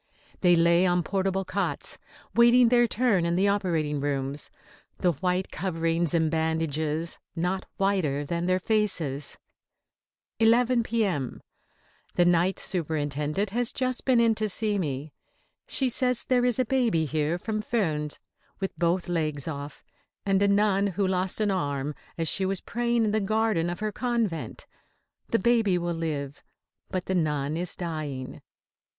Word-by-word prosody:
They 175 -2 +5
lay 170 +2 +4
on 175 0 +2
portable 195 +1 -1
cots, 200 +2 -3 0.3
waiting 235 0 +6
their 240 0 +4
turn 220 -6 +2
in 170 0 +1
the 190 +3 +3
operating 165 -7 0
rooms, 140 0 -2 0.5
the 180 - +2
white 180 +4 -1
coverings 165 -1 0
and 160 -2 +2
bandages 160 0 -1 0.2
not 180 +3 -2
whiter 175 -8 +1
than 170 +3 -2
their 185 0 +3
faces. 180 -9 -1 1.0
11 235 +2 +4
P.M. 200 - -1 0.8
The 175 - +4
Night 175 +2 +3
Superintendent 150 +2 -2
has 240 +2 0
just 255 -1 -2
been 255 -3 +3
in 230 -1 +4
to 215 0 -1
see 210 0 +1
me. 145 -3 -3 0.5
She 265 - +1
says 250 0 +1
there 250 -1 +2
is 245 -3 +2
a 255 - +2
baby 230 -10 +1
here 155 +2 0
from 215 +3 -3
Furnes 160 -10 -1 0.4
with 195 -1 -3
both 175 +1 +1
legs 155 -5 -1
off, 145 -2 -6 0.4
and 195 -1 +2
a 200 - +4
nun 200 0 +3
who 200 +1 -1
lost 185 +1 0
an 210 -2 +2
arm 145 -5 -1 0.2
as 165 -1 -1
she 190 - 0
was 190 0 0
praying 235 -1 0
in 210 - +1
the 215 - +2
garden 215 -4 +1
of 175 +3 -5
her 215 0 -1
convent. 230 -8 -2 0.6
The 230 - +2
baby 225 -4 +3
will 175 0 -2
live, 150 -4 -4 0.5
but 185 -2 -3
the 190 - -1
nun 150 -4 0
is 175 +1 -1
dying. 155 -7 -5
180 Hz, 150 wpm, -27 LUFS, 160-215 Hz, 1.0 s, waiting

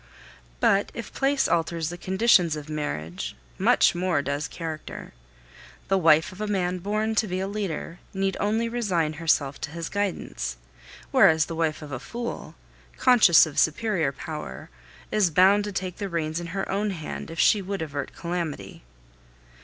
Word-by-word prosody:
But 195 - +3
if 230 - -7
place 275 0 +2
alters 165 -1 0
the 175 - -5
conditions 185 -3 +3
of 150 0 -8
marriage, 90 - -4 0.2
much - - +4
more 175 -4 0
does 145 +2 -2
character. 160 -2 -7 0.8
The 195 - +3
wife 160 +2 +4
of 185 +3 -10
a 215 - -1
man 185 -3 -1
born 215 +4 -1
to 220 0 +1
be 185 -1 -2
a 190 - -2
leader 195 -4 -4
need 195 0 -1
only 220 +3 +1
resign 190 -10 0
herself 145 -4 +1
to 150 - -3
his 165 +1 -5
guidance; 200 - -3 0.5
whereas 160 0 +5
the - - -6
wife 160 -1 -1
of 145 - -9
a 130 - -4
fool, 235 - -6 0.4
conscious 235 -10 +6
of 155 - -3
superior 165 -3 +1
power, 150 - -7 0.4
is 210 -4 +3
bound 195 +5 +5
to 205 - -4
take 185 -2 -4
the 200 -2 -4
reins 160 -1 -2
in 175 - -6
her 195 +3 -3
own 205 +2 -1
hand 165 -6 -6
if 165 - -7
she 210 - +5
would 195 -2 -3
avert 145 -3 -5
calamity. 170 - -4
175 Hz, 165 wpm, -25 LUFS, 155-200 Hz, 0.8 s, conscious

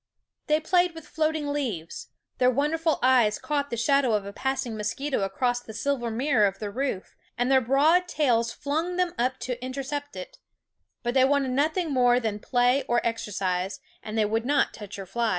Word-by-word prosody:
They 305 0 +3
played 355 +2 +2
with 325 -2 -10
floating 310 -1 -1
leaves; 235 - -4 0.3
their 250 - +5
wonderful 305 +5 +1
eyes 250 -5 +4
caught 285 -1 -2
the 235 - -3
shadow 270 0 +2
of 205 -2 0
a 200 - -7
passing 265 -1 -2
mosquito 230 +5 -2
across 245 +6 0
the 220 -3 -11
silver 240 0 -1
mirror 230 -2 +2
of 195 0 -4
their 210 -2 -5
roof, 255 -5 -3 0.2
and 245 +2 +1
their 265 -1 +5
broad 300 +9 +3
tails 240 -8 +1
flung 310 +7 -2
them 360 -1 0
up 255 +2 +1
to 250 -1 -4
intercept 280 +2 -4
it; 185 -1 -9 0.6
but 240 0 -1
they 260 -1 +5
wanted 275 -1 +2
nothing 310 +5 0
more 245 -1 +4
than 220 -3 -3
play 245 +4 +2
or 240 0 +2
exercise, 195 -4 -2 0.2
and 215 0 -6
they 215 - +3
would 225 +2 0
not 280 +3 +1
touch 205 -3 -9
your 195 - -6
flies. 230 +5 -1
255 Hz, 185 wpm, -26 LUFS, 225-290 Hz, 0.6 s, their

